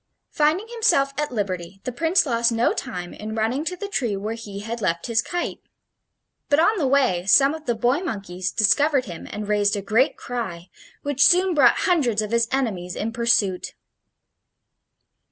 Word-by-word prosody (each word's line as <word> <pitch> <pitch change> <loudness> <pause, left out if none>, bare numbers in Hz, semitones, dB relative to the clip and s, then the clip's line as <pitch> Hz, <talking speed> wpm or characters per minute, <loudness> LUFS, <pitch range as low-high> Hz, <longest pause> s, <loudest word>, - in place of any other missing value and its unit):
Finding 310 +8 +1
himself 440 -13 +2
at 300 -1 -2
liberty, 190 -4 -4
the 255 - -3
Prince 325 +9 +2
lost 235 -2 +1
no 230 +1 +1
time 180 -1 -6
in 215 +1 -7
running 225 +6 -1
to 365 - -2
the 400 +3 -6
tree 240 - -2
where 210 +3 -4
he 205 -3 -8
had 230 +2 -5
left 170 -3 -1
his 230 -1 +1
kite. 350 +7 -4 0.9
But 285 - +4
on 420 +5 +3
the 285 - +1
way 255 -10 +1
some 275 +8 +5
of 315 -2 -9
the 240 - +1
boy 245 +6 +1
monkeys 195 - -4
discovered 275 +6 +2
him 170 -4 -9
and 210 0 -6
raised 205 0 +2
a 200 - -3
great 225 +7 +2
cry, 190 -8 -6 0.3
which 285 -1 +1
soon 360 +3 +4
brought 300 - +4
hundreds 250 - +1
of 210 - -6
his 235 0 +2
enemies 200 -10 -2
in 225 +2 -3
pursuit. 225 -6 0
235 Hz, 175 wpm, -23 LUFS, 205-285 Hz, 0.9 s, some